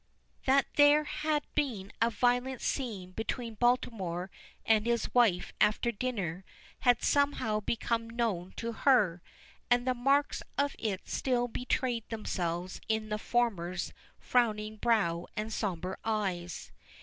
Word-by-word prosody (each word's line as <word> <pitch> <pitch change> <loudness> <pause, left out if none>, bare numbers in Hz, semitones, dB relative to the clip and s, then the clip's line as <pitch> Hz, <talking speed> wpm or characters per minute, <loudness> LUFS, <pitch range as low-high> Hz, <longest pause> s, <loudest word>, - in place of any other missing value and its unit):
That 270 +1 +4
there 290 +1 +7
had 300 0 -1
been 220 -9 -2
a 230 - +5
violent 245 +2 +1
scene 210 -9 -3
between 225 +3 -4
Baltimore 205 -7 0 0.3
and 220 0 +3
his 235 -1 0
wife 225 -8 +3
after 225 +3 +3
dinner 200 -7 -3 0.4
had 245 -2 +3
somehow 280 -7 +2
become 230 +1 -1
known 220 -6 -2
to 230 0 -3
her, 215 -9 +3 0.5
and 245 0 +3
the 255 - +2
marks 275 +4 +2 0.2
of 285 0 +1
it 200 -4 -3
still 245 -2 0
betrayed 245 -1 -2
themselves 180 -5 -3
in 220 -1 0
the 210 0 -2
former's 190 -8 -1 0.2
frowning 215 -3 +1
brow 195 -7 +1
and 215 +1 -2
sombre 185 -3 -2
eyes. 190 -6 -2
230 Hz, 125 wpm, -31 LUFS, 195-245 Hz, 0.5 s, there